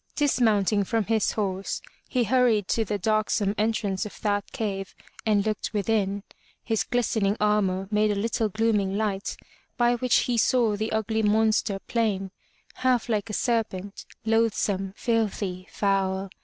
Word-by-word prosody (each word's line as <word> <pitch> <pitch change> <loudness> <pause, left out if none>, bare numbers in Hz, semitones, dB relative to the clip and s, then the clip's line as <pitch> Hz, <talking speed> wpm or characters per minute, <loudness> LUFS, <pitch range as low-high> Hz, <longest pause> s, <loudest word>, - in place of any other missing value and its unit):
Dismounting 220 -8 +2
from 225 +3 0
his 220 0 +1
horse, 195 -2 -2 0.3
he 250 -2 +1
hur 250 +3 +3
ried 210 -5 +1
to 225 - +2
the 210 0 -2
darksome 215 0 +1
entrance 210 -3 0
of 210 - -8
that 205 -1 -1
cave 195 -3 -4 0.3
and 205 -1 +3
looked 215 0 -2
within. 200 -1 0 0.4
His 225 -2 0
glistening 220 -4 0
armor 195 -3 +1
made 210 0 +3
a 205 - +1
little 220 +1 0
glooming 210 -2 +1
light, 205 -2 -2 0.4
by 240 -1 +4
which 250 0 +3
he 240 -2 0
saw 230 -2 +3
the 215 +2 -3
ugly 220 0 0
monster 215 -1 +2
plain, 200 -5 0 0.5
half 250 -2 +1
like 215 -1 0
a - - -5
serpent, 210 -5 -2 0.2
loathsome, 215 -4 +1
filthy, 205 -5 -1
foul. 195 -1 0
210 Hz, 145 wpm, -26 LUFS, 200-225 Hz, 0.5 s, by